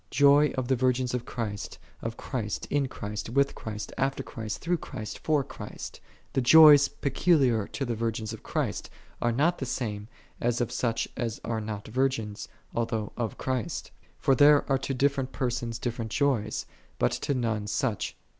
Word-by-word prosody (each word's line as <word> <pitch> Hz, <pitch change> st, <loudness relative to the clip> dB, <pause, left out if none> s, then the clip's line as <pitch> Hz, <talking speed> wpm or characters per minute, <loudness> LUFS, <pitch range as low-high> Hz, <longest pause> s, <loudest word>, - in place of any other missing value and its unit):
Joy 145 Hz, +1 st, +5 dB
of 130 Hz, -2 st, -1 dB
the 130 Hz, -, +3 dB
virgins 125 Hz, 0 st, +1 dB
of 125 Hz, -1 st, -2 dB
Christ, 105 Hz, -4 st, -4 dB, 0.2 s
of 115 Hz, 0 st, -4 dB
Christ, 110 Hz, -6 st, -3 dB
in 145 Hz, -2 st, +2 dB
Christ, 105 Hz, -4 st, -5 dB
with 140 Hz, +3 st, +2 dB
Christ, 105 Hz, -1 st, -6 dB
after 135 Hz, 0 st, 0 dB
Christ, 110 Hz, -4 st, -5 dB
through 175 Hz, +1 st, 0 dB
Christ, 110 Hz, -8 st, -7 dB
for 150 Hz, -3 st, +2 dB
Christ. -, -, -8 dB, 0.3 s
The 135 Hz, -, +2 dB
joys 145 Hz, +1 st, +9 dB
peculiar 135 Hz, -, +2 dB
to 135 Hz, -, -3 dB
the 120 Hz, -, -1 dB
virgins 110 Hz, -1 st, -2 dB
of 110 Hz, -, -9 dB
Christ, -, -, -2 dB, 0.3 s
are 120 Hz, -, +2 dB
not 155 Hz, +9 st, +2 dB
the 135 Hz, -, -3 dB
same 105 Hz, -5 st, -3 dB, 0.3 s
as 120 Hz, 0 st, +1 dB
of 120 Hz, -1 st, -1 dB
such 115 Hz, -2 st, 0 dB
as 115 Hz, -2 st, -3 dB
are 115 Hz, -1 st, -1 dB
not 105 Hz, -1 st, -5 dB
virgins, 115 Hz, -3 st, -1 dB, 0.3 s
al 115 Hz, -1 st, +1 dB
though 110 Hz, -2 st, -3 dB
of 115 Hz, -3 st, -3 dB
Christ. 130 Hz, -7 st, -3 dB, 0.3 s
For 135 Hz, -, +3 dB
there 145 Hz, +2 st, +6 dB
are 135 Hz, -1 st, +2 dB
to 135 Hz, -, -3 dB
different 135 Hz, 0 st, +1 dB
persons 120 Hz, -2 st, -2 dB
different 115 Hz, -2 st, -3 dB
joys, 115 Hz, -5 st, 0 dB, 0.3 s
but -, -, +2 dB
to 140 Hz, -, 0 dB
none 110 Hz, -4 st, -1 dB
such. 110 Hz, 0 st, -1 dB
120 Hz, 175 wpm, -28 LUFS, 110-135 Hz, 0.3 s, joys